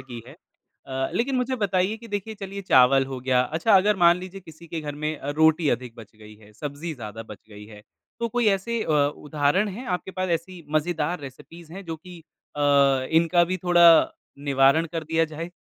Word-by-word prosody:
की 120 -3 -10
है। 135 - -12 0.5
अ, 135 0 -2
लेकिन 255 +3 0
मुझे 255 +1 -1
बताइए 195 0 0
कि 230 0 -13
देखिए 205 +2 -4
चलिए 195 0 -6
चावल 135 -4 +5
हो 135 -1 -6
गया 130 -1 +2
अच्छा 165 - +1
अगर 205 +2 +3
मान 170 -1 +5
लीजिए 185 +1 -9
किसी 165 0 -15
के 165 0 -5
घर 145 -1 -6
में 150 +1 -3
अ, 145 - -5
रोटी 160 +1 +3
अधिक 120 -1 -3
बच 110 -2 -13
गई 105 0 -14
है, 105 0 -19
सब्जी 145 +6 -6
ज़्यादा 110 -2 -8
बच 105 -2 -11
गई 105 0 -12
है। 105 -1 -14 0.4
तो 235 - -1
कोई 240 0 0
ऐसे 220 +4 -1
अ, - - -4 0.3
उदाहरण 150 +7 0
हैं 230 +7 -8
आपके 190 - -11
पास 185 0 -3
ऐसी 175 -1 -14
मज़ेदार 160 +1 -1
रेसिपीज़ 160 +5 -12
हैं 195 +2 -9
जो 165 -1 -5
कि 175 +2 -13 0.4
अ, - - -4 0.5
इनका 170 +2 +3
भी 185 +2 -2
थोड़ा 170 -2 +6 0.3
निवारण 140 +3 +3
कर 165 -2 -4
दिया 165 +1 +1
जाए। 165 +3 -6
165 Hz, 205 wpm, -24 LUFS, 135-185 Hz, 0.5 s, थोड़ा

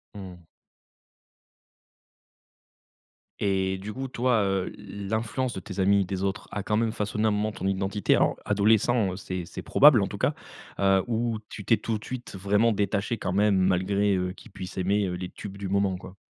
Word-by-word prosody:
Mmh. 90 -4 -10 2.9
Et 95 -2 0
du 100 +3 -7
coup, 135 +3 -4
toi, 125 -2 +1
heu, 95 -1 -1
l 100 -1 -8
l'influence 115 +3 -1
de - - -5
tes 95 - -8
amis, 100 +1 +4
des 95 +1 -3
autres, 100 +1 -2
a 100 - -3
quand 105 - 0
même 115 0 +1
façonné, 105 0 -1
un - - +3
moment, 105 +1 0
ton 95 - -4
identité? 95 +1 +1
Alors - - +2
adolescent, 105 +1 +3
heu, - - -5
c'est 90 -2 -5
c'est - - -8
probable, - - +6
en - - 0
tout - - -7
cas. - - +1 0.5
Heu, 95 -1 +4
ou 115 -1 0
tu 105 - -8
t'es 115 +4 +3
tout 110 -2 -2
de - - -14
suite 125 -4 -7
vraiment 105 +4 +2
détaché, 105 +2 -1
quand 90 -3 -3
même, 105 +1 +3
malgré, 95 +2 +2
heu, 90 0 -1
qu'ils 115 - -15
puissent 95 0 -8
aimer, 100 +2 +1
heu, 90 - -3
les 90 0 -5
tubes 100 +1 -9
du 100 -1 -5
moment, 100 -1 +1
quoi? 95 +1 -12
100 Hz, 190 wpm, -27 LUFS, 95-110 Hz, 2.9 s, probable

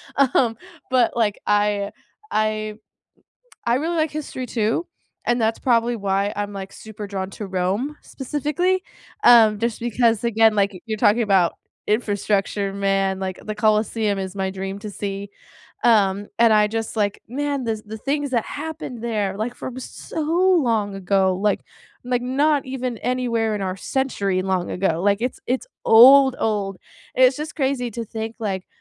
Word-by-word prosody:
Um, 255 -4 +3 0.3
but 255 -2 +3
like, 215 -3 +1
I 205 -1 +1 0.4
I 215 0 -1 0.9
I 235 - +3
really 325 +5 -1
like 315 -1 +1
history 285 -4 -5
too, 230 +8 -1 0.4
and 240 0 +2
that's 220 0 +1
probably 240 -1 +2
why 200 0 0
I'm, 205 0 -3
like, 195 -1 -7
super 215 -1 -9
drawn 190 -1 -4
to 210 - -6
Rome 195 +10 -1
specifically. 300 +7 -1 0.4
Um, 220 -3 +7
just 230 0 -1
because, 235 -1 +1
again, 225 -1 +4
like, 200 -2 0
you're 220 -1 -2
talking 210 +3 +4
about 195 -5 +3 0.3
infrastructure, 205 -2 0
man. 195 -1 0
Like, 190 -1 -4
the 215 - -4
Colosseum 215 -1 +1
is 190 -1 -4
my 190 -1 -1
dream 195 +1 -5
to 210 0 -6
see. 200 0 -5 0.6
Um, 205 -3 +3
and 230 0 +6
I 210 -1 +5
just, 225 +1 -4
like 205 -2 0
man, 280 +2 -2
the 220 -2 -2
the 220 +1 -7
things 285 +4 -2
that 235 -4 +1
happened 300 -6 -6
there, 210 -5 -1
like, 225 +4 -3
from 255 0 -7
so 260 - -7 0.4
long 215 -5 0
ago, 190 0 +1
like 205 +1 +1 0.4
like, 245 -1 0
not 285 +3 +2
even 255 -2 -3
anywhere 230 -2 0
in 205 - -3
our 185 -1 -2
century 200 -5 -1
long 185 -2 -1
ago. 180 -3 0
Like, 200 -1 +3
it's 250 - -2
it's 255 +1 -1 0.2
old 265 +3 +8
old. 200 -3 -1 0.4
It's 255 0 +5
just 305 +1 -5
crazy 265 -4 0
to 235 +2 -4
think, 225 +1 -5
like, 195 -4 -3
220 Hz, 160 wpm, -22 LUFS, 200-250 Hz, 0.9 s, old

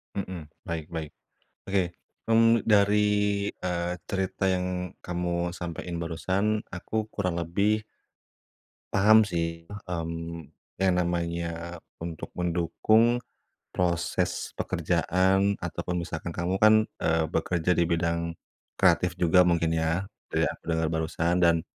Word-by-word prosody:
Mhm, 90 -6 -5 0.2
baik 80 -2 -3
baik. 80 -3 -4 0.6
Oke, 95 -2 +2 0.5
mmm, 115 0 +5
dari, 105 -1 +4 0.6
eee, 90 -1 -2 0.2
cerita 95 0 -1
yang 90 -1 -2
kamu 85 0 -1
sampein 85 0 -5
barusan. 95 +6 -1
Aku, 90 +4 -5 0.2
kurang 90 -4 -1
lebih 100 +6 +1 1.1
paham 110 +3 +6
sih, 85 -3 -3 0.2
mmm, 85 -2 -5 0.3
yang 95 -1 +4
namanya 85 0 -2 0.2
untuk 85 -2 -5
mendukung 110 +8 +2 0.5
proses 85 -2 -1
pekerjaan, 95 +2 +1
ataupun, 90 0 -3
misalkan, 85 +1 -5
kamu 90 +2 -2
kan, 110 0 +8 0.3
eee, 80 -1 +2
bekerja 85 +2 0
di 85 - +2
bidang 85 0 0 0.5
kreatif 90 -1 +3
juga 90 +1 +5
mungkin, 85 -2 +2
ya, 80 +4 0 0.2
dari - - +2
aku - - -5
dengar, 80 0 +1
barusan. 85 +2 0
Dan, 85 -1 +3
85 Hz, 115 wpm, -27 LUFS, 85-95 Hz, 1.1 s, kan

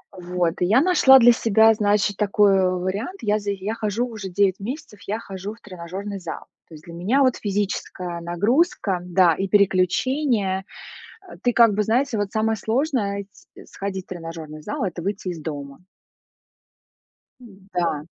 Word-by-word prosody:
вот. 175 -2 -1
Я 215 +9 +4
нашла 275 -7 +6
для 240 0 +7
себя, 225 -1 +4
значит, 205 -1 +1
такой, 205 -1 +3
а, - - +2
вариант. 195 - -3
Я 210 0 +1
за 205 0 -3
я 200 +3 -4
хожу 225 +2 -2
уже 210 -5 -7
9 195 +1 +1
месяцев, 215 -1 -7
я 215 +3 -2
хожу 195 0 -7
в - - -24
тренажёрный 195 +1 -7
зал. 170 - -7 0.2
То 160 - -12
есть 155 - -14
для 170 - -11
меня, 210 +12 +1
вот, 255 -2 +3
физическая 190 -4 -3
нагрузка, 200 - +1
да, 180 -1 +3
и 195 - -2
переключение. 200 - +1 0.6
Э, - - -11
ты, 245 - +2
как 230 -3 +5
бы, 210 - +1
знаете, 235 +2 0
вот 205 -1 -2
самое 220 0 0
сложное 220 -4 -1
ить 200 0 -15
сходить 190 -1 -5
в - - -53
тренажёрный 165 -3 -8
зал- 210 - -3
это 180 -2 -4
выйти 195 0 -3
из 170 -3 -5
дома. 145 +1 -7 1.6
М-да. 190 -8 -4
200 Hz, 160 wpm, -22 LUFS, 180-220 Hz, 1.6 s, для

